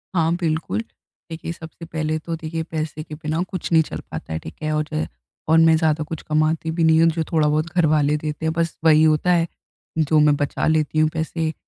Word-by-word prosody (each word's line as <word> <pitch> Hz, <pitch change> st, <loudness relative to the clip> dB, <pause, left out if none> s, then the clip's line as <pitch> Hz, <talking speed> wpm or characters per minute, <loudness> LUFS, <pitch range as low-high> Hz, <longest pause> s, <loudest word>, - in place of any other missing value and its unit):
हाँ 165 Hz, -1 st, +2 dB
बिल्कुल, 165 Hz, +2 st, -1 dB, 0.5 s
देखिए 165 Hz, +1 st, -5 dB
सबसे 165 Hz, 0 st, -10 dB
पहले 155 Hz, -1 st, -2 dB
तो 165 Hz, +1 st, -4 dB
देखिए 160 Hz, 0 st, -4 dB
पैसे 155 Hz, -1 st, -3 dB
के 150 Hz, -, -9 dB
बिना 155 Hz, +2 st, -2 dB
कुछ 185 Hz, -3 st, -5 dB
नहीं 160 Hz, -1 st, +6 dB
चल -, -, -7 dB
पाता -, -, -6 dB
है, 80 Hz, -, -2 dB
ठीक 80 Hz, -, -10 dB
है। 155 Hz, -, 0 dB
और 150 Hz, 0 st, 0 dB, 0.6 s
और, 160 Hz, -, +6 dB
मैं 165 Hz, 0 st, +6 dB
ज़्यादा 155 Hz, -1 st, +1 dB
कुछ 160 Hz, +1 st, -6 dB
कमाती 155 Hz, +1 st, 0 dB
भी 165 Hz, +1 st, 0 dB
नहीं 160 Hz, 0 st, +5 dB
हूँ, 165 Hz, -, +6 dB
जो 160 Hz, 0 st, -1 dB
थोड़ा 155 Hz, -2 st, +3 dB
बहुत 155 Hz, +1 st, +1 dB
घर 175 Hz, -2 st, +4 dB
वाले 150 Hz, -1 st, +2 dB
देते 150 Hz, +1 st, -4 dB
हैं, 160 Hz, -, +1 dB
बस 165 Hz, 0 st, -1 dB
वही 155 Hz, -1 st, +6 dB
होता 155 Hz, +3 st, +3 dB
है। 170 Hz, -1 st, +2 dB, 0.5 s
जो 155 Hz, 0 st, +3 dB
मैं 150 Hz, -1 st, +5 dB
बचा 145 Hz, 0 st, -1 dB
लेती 155 Hz, -1 st, +1 dB
हूँ 155 Hz, 0 st, +4 dB
पैसे, 160 Hz, 0 st, -2 dB
160 Hz, 220 wpm, -22 LUFS, 155-165 Hz, 0.6 s, नहीं